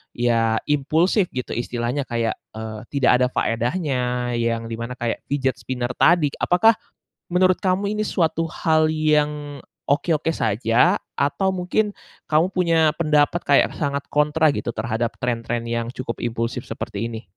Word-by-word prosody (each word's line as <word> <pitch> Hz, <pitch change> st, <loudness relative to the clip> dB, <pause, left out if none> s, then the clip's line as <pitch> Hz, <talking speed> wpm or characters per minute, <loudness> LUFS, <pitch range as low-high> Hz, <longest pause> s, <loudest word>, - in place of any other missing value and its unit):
ya 115 Hz, -2 st, +2 dB, 0.2 s
impulsif 160 Hz, +7 st, +2 dB
gitu, 125 Hz, -, -4 dB
istilahnya 120 Hz, +3 st, -2 dB
kayak, 115 Hz, -2 st, -1 dB, 0.2 s
eee, 110 Hz, -1 st, -6 dB
tidak 140 Hz, -3 st, +2 dB
ada 125 Hz, -, +3 dB
faedahnya, 125 Hz, 0 st, -1 dB
yang 115 Hz, 0 st, -1 dB
di 115 Hz, -, -5 dB
mana 115 Hz, +2 st, -5 dB
kayak 120 Hz, -2 st, -2 dB
fidget 135 Hz, -2 st, -1 dB
spinner 125 Hz, -1 st, -3 dB
tadi. 165 Hz, -4 st, +4 dB
Apakah 220 Hz, +5 st, +4 dB, 0.5 s
menurut 185 Hz, +1 st, +3 dB
kamu 195 Hz, +2 st, 0 dB
ini 215 Hz, 0 st, -1 dB
suatu 165 Hz, -1 st, 0 dB
hal 155 Hz, -1 st, +2 dB
yang, 150 Hz, -2 st, 0 dB, 0.3 s
oke-oke 160 Hz, +2 st, +1 dB
saja, 115 Hz, -, +2 dB, 0.2 s
atau 145 Hz, +7 st, 0 dB
mungkin 200 Hz, +3 st, -1 dB, 0.3 s
kamu 160 Hz, +4 st, +2 dB
punya 165 Hz, -4 st, +3 dB
pendapat 150 Hz, +1 st, +3 dB
kayak 140 Hz, -, +4 dB
sangat 140 Hz, -1 st, -1 dB
kontra 150 Hz, +1 st, +3 dB
gitu, 120 Hz, -4 st, -4 dB
terhadap 115 Hz, +1 st, -2 dB
tren-tren 120 Hz, -1 st, -2 dB
yang 115 Hz, 0 st, -2 dB
cukup 130 Hz, -2 st, -5 dB
impulsif 115 Hz, 0 st, -3 dB
seperti 105 Hz, +3 st, -4 dB
ini? 115 Hz, 0 st, -7 dB
140 Hz, 140 wpm, -22 LUFS, 120-160 Hz, 0.5 s, tadi